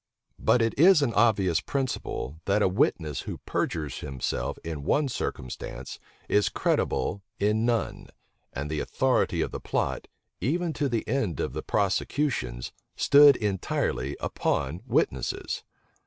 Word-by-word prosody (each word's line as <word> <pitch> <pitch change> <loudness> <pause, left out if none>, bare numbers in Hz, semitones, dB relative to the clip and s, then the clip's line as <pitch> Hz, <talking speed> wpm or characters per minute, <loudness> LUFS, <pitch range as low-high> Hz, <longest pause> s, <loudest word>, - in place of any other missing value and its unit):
But 120 - +3
it 115 - +1
is 170 -2 +7
an 120 -4 0
obvious 100 -6 +3
principle, 125 - -3
that 100 +1 +2
a - - +5
witness 80 -6 0
who - - -6
perjures 75 -3 -2
himself 65 -2 -3
in 80 -3 -5
one 145 - +2
circumstance 65 - -5 0.3
is 105 0 +3
credible 100 +1 0 0.2
in 105 +3 +2
none 115 -4 -1 0.4
and 70 +2 -4
the 75 - -1
authority - - +1
of - - -1
the - - -5
plot, - - -2 0.3
even 165 - 0
to 145 -2 -1
the 115 -3 -2
end 110 - -1
of - - -2
the 75 - -3
prosecutions, 100 - -1 0.2
stood 145 -1 +7
entirely 85 - -1
upon 80 +7 -1
witnesses. - - -1
100 Hz, 135 wpm, -27 LUFS, 75-130 Hz, 0.4 s, is